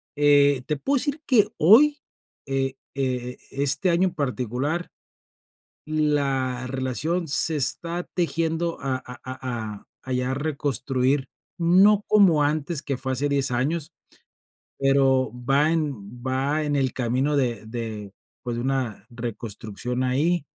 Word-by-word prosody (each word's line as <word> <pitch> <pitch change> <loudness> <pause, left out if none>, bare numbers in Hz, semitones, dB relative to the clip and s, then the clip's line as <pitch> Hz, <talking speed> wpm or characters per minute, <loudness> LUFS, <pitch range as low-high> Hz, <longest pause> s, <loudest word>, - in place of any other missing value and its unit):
Eh, 145 -2 +4
te 150 - -1
puedo 275 - 0
decir 285 +3 -1
que 235 -6 +4
hoy 285 - +6 0.5
e 135 -1 -2 0.2
e 125 -2 -2
este 140 +7 +2
año 175 +3 +3
en - - -14
particular 140 +4 -2 1.0
la 140 -5 0
relación 140 +7 -2
se 155 +2 +3
está 170 +5 -1
tejiendo 165 -1 -1
a 135 -1 -1
a 125 -1 -10
a 120 -5 -5 0.2
a 130 - -5
ya 125 +1 0
reconstruir, 135 -2 -1 0.3
no 190 +5 +5
como 190 -8 +5
antes 150 +1 -1
que 140 -3 -2
fue 130 - -3
hace 140 +3 0
10 140 -1 +1
años. 140 +6 -1 0.9
Pero 135 -3 +3 0.2
va 145 +3 +4
en 125 -8 -3
va 135 +4 0
en 145 -1 0
el 130 -2 +1
camino 130 +4 0
de 120 -5 -1
de, 110 -3 -5 0.3
pues, 120 -1 -3
de 120 - -2
una 130 -6 -2
reconstrucción 120 +1 -5
ahí, 150 +6 +1
135 Hz, 130 wpm, -24 LUFS, 125-155 Hz, 1.0 s, hoy